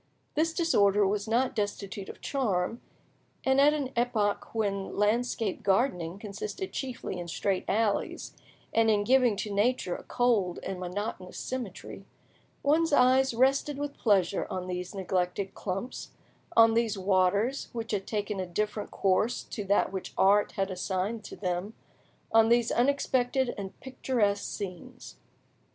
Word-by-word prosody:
This 320 +2 +1
disorder 210 - +3
was 205 +2 -1
not 250 +4 +1
destitute 205 -2 -3
of - - -10
charm, 225 -5 -1 0.6
and 265 +1 +4
at 290 +1 +6
an 275 -4 -3
epoch 230 -3 0
when 200 -3 -2
landscape 215 0 0
gardening 190 -5 +1
consisted 210 - -6
chiefly 255 -8 -4
in 175 - -6
straight 190 +3 -1
alleys, 210 0 -1 0.4
and 225 0 +4
in 210 -1 +3
giving 250 -1 +4
to 205 +1 -4
nature 205 -3 +1
a - - -8
cold 220 -8 +1
and 190 -1 -4
monotonous 185 0 -5
symmetry, 245 -8 -6 0.6
one's 315 +3 +3
eye 260 -1 +5
rested 275 +3 +2
with 290 0 -4
pleasure 200 -4 +2
on 185 -1 -3
these 180 +1 -5
neglected 185 0 -1
clumps, 195 +6 -5 0.4
on 225 0 +7
these 225 -2 +1
waters 195 +6 +1
which 230 -1 -5
had 200 -2 -2
taken 210 -2 -2
a 185 - -3
different 210 +3 -2
course 200 +5 +1
to 210 - -6
that 200 -1 +2
which 190 -1 -6
art 205 +2 +4
had 195 0 -1
assigned 190 +4 -2
to - - -8
them, 185 +3 -3 0.6
on 225 0 +5
these 235 0 +3
unexpected 260 -1 +1
and 195 -2 -7
picturesque 235 -6 0
scenes. 185 -4 -7
210 Hz, 140 wpm, -29 LUFS, 195-245 Hz, 0.6 s, on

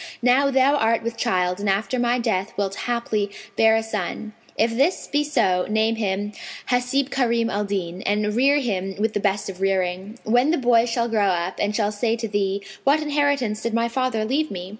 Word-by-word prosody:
Now 260 +3 +4
thou 270 +2 +3
art 225 -2 +1
with 230 0 -3
child 185 -6 0
and 205 0 -1
after 200 +5 0
my 240 0 +2
death 220 -6 -1
wilt 195 -1 -1 0.2
haply 220 -4 -1 0.3
bear 225 0 +5
a 225 - +1
son: 220 -1 -4 0.2
if 230 +1 +1
this 280 +9 +1
be 290 +1 0
so, 185 -11 +1
name 220 +1 +1
him 205 -1 -2 0.4
Hαsib 250 +2 +1
Karνm 235 -3 +1
al 205 0 -1
Dνn[FN#508] 185 -2 -3
and 210 +1 0
rear 275 +4 +4
him 195 -7 -2
with 215 +1 0
the - - 0
best 200 0 0
of 190 -1 -8
rearing. 190 +2 -1
When 245 +6 +2
the 335 - +2
boy 240 -2 +3
shall 235 0 0
grow 215 -3 +1
up 180 0 -1
and 205 +1 0
shall 210 -2 +1
say 225 +2 0
to 230 -1 -4
thee, 200 -1 -1 0.2
'What 285 +3 +4
inheritance 285 -7 0
did 230 -1 -2
my 230 0 +1
father 235 -3 -1
leave 290 +7 0
me?'' 180 -1 -6
225 Hz, 205 wpm, -23 LUFS, 200-245 Hz, 0.4 s, bear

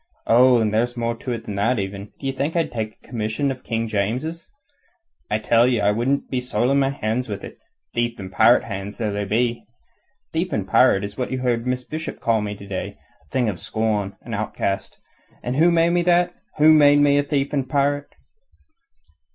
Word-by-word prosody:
Oh, 125 +2 +6
and 110 -2 0
there's 120 +3 0
more 115 0 0
to 125 - -5
it 115 -2 -4
than 105 - -5
that, 115 +5 +2
even. 100 0 -5
D'ye 135 -1 -2
think 140 +5 -2
I 170 - +3
could - - -9
take 110 -2 -4
a - - -19
commission 115 +4 -1
of 130 -1 -8
King 115 -1 -2
James's? 125 +11 -2 0.8
I 105 - +1
tell 115 +2 +3
you 120 -4 +1
I 100 0 +3
wouldn't 125 +6 0
be 130 -2 0
soiling 125 +2 +1
my 135 -1 +2
hands 125 -2 -2
with 100 -1 -5
it - - -10 0.3
thief 120 0 -1
and 95 -3 -8
pirate's 115 +4 +5
hands 100 -1 -6
though 110 -3 -1
they 100 0 -2
be. 115 +3 0 0.7
Thief - - -1
and - - -1
pirate 95 - +4
is 100 +4 -6
what 125 - -1
you 130 - -1
heard 120 -1 0
Miss 125 0 -1
Bishop 155 +4 -6
call 115 -2 +1
me 105 0 -4
to 100 - -11
day 100 -2 -5 0.3
a - - -31
thing 125 - 0
of 100 -5 -3
scorn, 105 -3 -1
an - - -8
outcast. 100 0 -3 0.4
And 125 +2 -2
who 165 +3 +5
made 170 0 +3
me 175 0 +2
that? 175 0 +3 0.2
Who 155 +1 +7
made 145 -1 +6
me 145 0 +4
thief 140 0 -1
and 135 -3 -1
pirate?" 145 0 0
120 Hz, 210 wpm, -22 LUFS, 105-140 Hz, 0.8 s, Who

